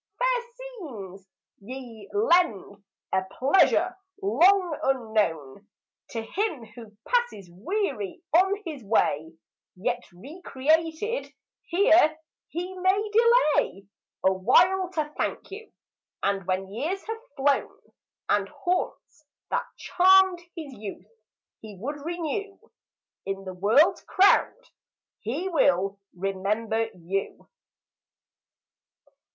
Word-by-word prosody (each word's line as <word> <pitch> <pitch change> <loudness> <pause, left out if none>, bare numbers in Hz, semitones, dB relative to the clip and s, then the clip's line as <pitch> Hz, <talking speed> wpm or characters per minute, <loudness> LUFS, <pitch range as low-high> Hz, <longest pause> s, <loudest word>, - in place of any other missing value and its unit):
Fair - - +1 0.2
scenes, 250 - -9 0.3
ye 235 -1 -10
lend 345 - +1 0.3
a 190 - +3 0.2
pleasure, 360 +5 +3 0.3
long 380 -3 +4
unknown, 210 - -1 0.4
To 225 -1 -4
him 335 - -2
who 215 -1 -14
passes 480 - -1
weary 270 - -3
on 385 +4 +4
his 300 -7 -6
way; 160 -6 0 0.4
Yet 230 +6 -2
recreated 320 - -1 0.4
here 335 -4 +4 0.3
he 355 +3 -5
may 395 +3 +1
delay 440 - +3 0.4
A 190 - +5
while 355 - +3
to 305 -2 -2
thank - - -3
you; 435 +3 -9 0.5
and 195 -2 0
when 190 +1 -2
years 325 - -3
have 450 +1 -6 0.2
flown, 275 +1 +1 0.5
And - - +1
haunts 360 -3 -3 0.3
that - - -1
charmed 380 0 +5 0.2
his 310 -5 -7
youth 200 -5 -8 0.5
he 210 -3 -11
would 280 +8 -5
renew, 350 +4 -4 0.7
In 195 0 -3
the 185 - -6
world's 230 - +4
crowd 400 +5 +3 0.6
he 275 - -3
will 195 - +2 0.2
remember 210 +4 -1
you. 185 +3 -4
285 Hz, 100 wpm, -26 LUFS, -, 0.7 s, A